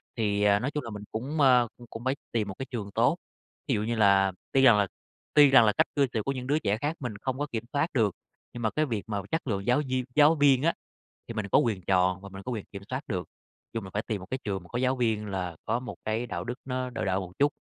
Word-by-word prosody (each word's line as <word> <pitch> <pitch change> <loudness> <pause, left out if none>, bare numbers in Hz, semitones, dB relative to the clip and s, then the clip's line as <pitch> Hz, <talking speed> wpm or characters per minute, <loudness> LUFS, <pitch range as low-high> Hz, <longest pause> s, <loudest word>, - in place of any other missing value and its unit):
Thì, 105 -3 0
à, 100 0 +5
nói 135 +4 -2
chung 150 -3 -3
là 115 - -6
mình 105 -2 -7
cũng, 140 +8 -2
ơ, 125 -3 +6
cũng 120 -1 -13
cũng 115 - -8
phải 130 +1 +1 0.2
tìm 110 -3 0
một 95 - -5
cái 135 - -3
trường 105 -4 -4
tốt, - - +2 0.5
thí - - +1
dụ 105 - -1
như 115 +1 -1
là 100 -2 +4 0.2
tuy 135 - +4
rằng 120 -5 +7
là 100 -1 +2 0.5
tuy 145 -2 +8
rằng 130 -4 +7
là 105 - +5
cách - - +2
cư 140 -2 +3
xử 110 -3 0
của 135 - -1
những 130 -1 -5
đứa 150 +2 +2
trẻ 105 -4 0
khác 145 +7 -2
mình 120 -6 -5
không 130 +5 -3
có 145 - -1
kiểm 115 -1 -2
soát 145 +3 +2
được, 110 -7 +2 0.4
nhưng 120 - -6
mà 110 - +3
cái 155 0 +1
việc 110 -7 -3
mà 100 -2 -1
chất 160 -4 -1
lượng 100 -3 -1
giáo 125 +4 +4
viên 130 -1 0
giáo 150 +2 +6
viên 140 -3 +4
á, 170 - +3 0.6
thì 115 - -5
mình 105 -2 -3
có - - +5
quyền 105 -6 0
chọn 95 0 +2
và 100 - -10
mình 95 0 -9
có 125 - -4
quyền 110 -4 -4
kiểm 100 0 -7
soát 130 +1 -1
được. 90 -4 -3 0.4
Chung 115 -3 -3
là 95 - -8
phải 105 - -1
tìm 105 -4 -3
một 95 - -10
cái 130 - -1
trường 95 -3 -2
mà 90 - -15
có 120 - -3
giáo 130 +1 +1
viên 110 -3 0
là 90 -4 -3
có 120 - 0
một 125 - -7
cái 110 +3 -1
đạo - - -4
đức 120 - -3
nó 130 -1 -3
đỡ 115 -3 -3
đỡ 95 -1 +1
một 90 -1 -7
chút, 145 +1 +3
115 Hz, 290 wpm, -28 LUFS, 100-130 Hz, 0.6 s, tuy